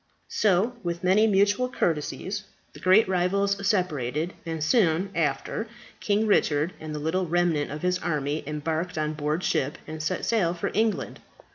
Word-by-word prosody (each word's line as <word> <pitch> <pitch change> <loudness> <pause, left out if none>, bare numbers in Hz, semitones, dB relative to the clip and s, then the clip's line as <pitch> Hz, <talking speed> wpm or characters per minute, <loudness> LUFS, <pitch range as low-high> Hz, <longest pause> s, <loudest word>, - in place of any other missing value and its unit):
So, 210 +3 +2
with 170 -2 -4
many 195 +4 +4
mutual 205 +4 +3
courtesies, 190 - -2 0.3
the - - -12
great 190 +4 +5
rivals 190 +2 +1
separated, 160 - 0
and, 160 -2 -3
soon 180 0 +2
after, 165 +7 -1 0.3
King 210 +1 +1
Richard 160 -5 +2
and 155 -1 -6
the - - -3
little 165 +5 -1
remnant 170 -3 +1
of 150 +3 -6
his 180 0 +1
army 150 -2 -2
embarked 160 +3 -3
on 155 0 -1
board 150 +3 -2
ship, 140 +2 0
and 155 0 -6
set 155 - -2
sail 185 -7 +1
for 170 - -3
England. 220 +1 0
175 Hz, 155 wpm, -26 LUFS, 155-200 Hz, 0.3 s, great